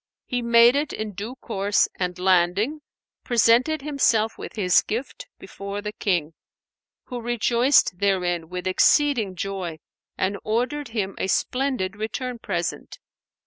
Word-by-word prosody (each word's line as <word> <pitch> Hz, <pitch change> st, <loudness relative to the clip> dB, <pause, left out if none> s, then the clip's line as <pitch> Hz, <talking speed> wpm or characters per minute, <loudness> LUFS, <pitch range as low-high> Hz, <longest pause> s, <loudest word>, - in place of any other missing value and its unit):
He 245 Hz, -1 st, -2 dB
made 235 Hz, +1 st, +6 dB
it 290 Hz, +1 st, 0 dB
in 215 Hz, -1 st, -4 dB
due 210 Hz, +7 st, -6 dB
course 205 Hz, -5 st, 0 dB
and 180 Hz, -1 st, -2 dB
landing, 190 Hz, -, +2 dB, 0.4 s
presented 245 Hz, +5 st, +3 dB
himself 235 Hz, -7 st, +1 dB
with -, -, -9 dB
his 185 Hz, -5 st, +4 dB
gift 275 Hz, -, -5 dB
before 200 Hz, +1 st, -7 dB
the 210 Hz, 0 st, -5 dB
King; 175 Hz, -7 st, -1 dB, 0.7 s
who 245 Hz, -2 st, -6 dB
rejoiced 240 Hz, -3 st, +2 dB
therein 180 Hz, -4 st, 0 dB
with 180 Hz, 0 st, -5 dB
exceeding 220 Hz, +1 st, +3 dB
joy 185 Hz, -3 st, -4 dB, 0.4 s
and 195 Hz, +2 st, -1 dB
ordered 250 Hz, +7 st, -1 dB
him 205 Hz, -4 st, -3 dB
a -, -, -1 dB
splendid 250 Hz, -3 st, -1 dB
return 235 Hz, +3 st, -4 dB
present. 175 Hz, -5 st, -4 dB
215 Hz, 130 wpm, -24 LUFS, 190-250 Hz, 0.7 s, made